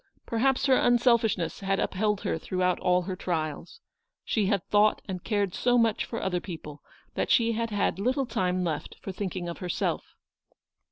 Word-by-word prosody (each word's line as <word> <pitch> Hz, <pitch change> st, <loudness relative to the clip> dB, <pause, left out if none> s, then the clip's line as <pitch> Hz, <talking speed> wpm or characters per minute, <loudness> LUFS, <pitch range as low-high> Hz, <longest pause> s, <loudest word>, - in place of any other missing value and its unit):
Perhaps 260 Hz, +4 st, +1 dB
her 265 Hz, -2 st, +5 dB
unselfishness 235 Hz, -7 st, +2 dB
had 195 Hz, 0 st, 0 dB
upheld 210 Hz, +1 st, 0 dB
her 160 Hz, -, -1 dB
throughout 180 Hz, +1 st, 0 dB
all 180 Hz, 0 st, +2 dB
her 185 Hz, +1 st, -4 dB
trials. 165 Hz, -, -4 dB, 0.4 s
She 210 Hz, -4 st, +1 dB
had 200 Hz, -3 st, +1 dB
thought 210 Hz, +1 st, +4 dB
and 185 Hz, -3 st, -5 dB
cared 205 Hz, -4 st, 0 dB
so 245 Hz, 0 st, +2 dB
much 225 Hz, -2 st, +2 dB
for 230 Hz, -, -4 dB
other 180 Hz, -2 st, 0 dB
people, 150 Hz, -5 st, -8 dB, 0.3 s
that -, -, -1 dB
she 230 Hz, -2 st, +4 dB
had 230 Hz, 0 st, -1 dB
had 205 Hz, -3 st, 0 dB
little 260 Hz, +6 st, +1 dB
time 185 Hz, -6 st, 0 dB
left 160 Hz, -4 st, -3 dB
for 195 Hz, -, -6 dB
thinking 185 Hz, -2 st, -4 dB
of 170 Hz, -, -6 dB
herself. 180 Hz, -2 st, -2 dB
200 Hz, 170 wpm, -28 LUFS, 180-230 Hz, 0.4 s, her